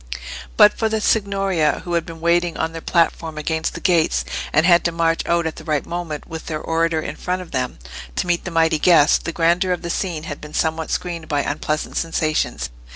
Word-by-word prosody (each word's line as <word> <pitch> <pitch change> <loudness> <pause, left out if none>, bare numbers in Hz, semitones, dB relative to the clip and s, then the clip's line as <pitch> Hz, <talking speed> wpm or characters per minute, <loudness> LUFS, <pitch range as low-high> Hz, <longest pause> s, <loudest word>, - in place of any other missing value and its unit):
But 210 - +7
for 220 - 0
the 220 0 0
Signoria, 195 -7 +1
who 175 - -3
had 170 0 0
been 165 -1 -8
waiting 170 0 +2
on 160 - -1
their 165 0 -7
platform 165 -2 0
against 160 +1 -2
the - - -5
gates, 170 -4 +2 0.3
and 155 +2 +3
had 175 -1 +5
to 170 - +2
march 165 0 +1
out 170 0 +2
at 160 - -3
the - - -9
right 150 -3 -1
moment, 170 -4 -5
with 160 -1 -8
their 155 -1 -3
orator 165 0 0
in - - -5
front 185 0 -3
of 180 - -16
them, 130 -2 -2 0.4
to - - 0
meet 175 -1 0
the - - -4
mighty 165 -2 +2
guest, 165 -3 +5
the 170 - -1
grandeur 175 +3 +2
of 180 - -5
the 170 - -2
scene 170 -5 -2
had 145 -2 -6
been 150 0 -9
somewhat 160 0 0
screened 170 -3 -3
by 145 -1 +1
unpleasant 155 +1 -2
sensations. 155 - -1
165 Hz, 220 wpm, -21 LUFS, 160-175 Hz, 0.4 s, But